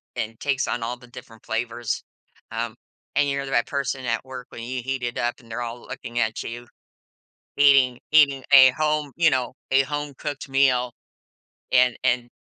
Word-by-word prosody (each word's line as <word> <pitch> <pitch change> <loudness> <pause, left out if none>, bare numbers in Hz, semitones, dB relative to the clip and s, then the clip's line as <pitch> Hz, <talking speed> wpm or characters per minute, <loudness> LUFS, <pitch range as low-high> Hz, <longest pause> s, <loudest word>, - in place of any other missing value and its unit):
and 110 +1 -4
takes 140 -2 0
on 115 - -2
all 120 +2 -3
the 125 - -16
different 120 -2 -13
flavors, 115 0 -2 0.5
um, 115 0 -3 0.4
and 145 0 +3
you're 140 0 -2
the 135 - -7
right 120 - +2
person 135 -2 -3
at 115 0 -1
work 130 0 -8
when 115 - -8
you 125 +1 -4
heat 135 -1 -3
it 120 0 -3
up, 120 0 0
they're 115 0 -7
all 120 0 -5
looking 120 +1 -6
at 110 -1 -1
you, 120 +1 -7 0.9
eating 135 -3 +5
eating 140 -4 +5
a 130 -2 +10
home, 150 0 0
you 165 -2 +5
know, 130 -3 -1 0.2
a 135 - +6
home-cooked 145 +1 -5
meal, 130 -3 +2 0.8
and 125 -2 +4
and 120 0 +1
125 Hz, 175 wpm, -24 LUFS, 120-140 Hz, 0.9 s, a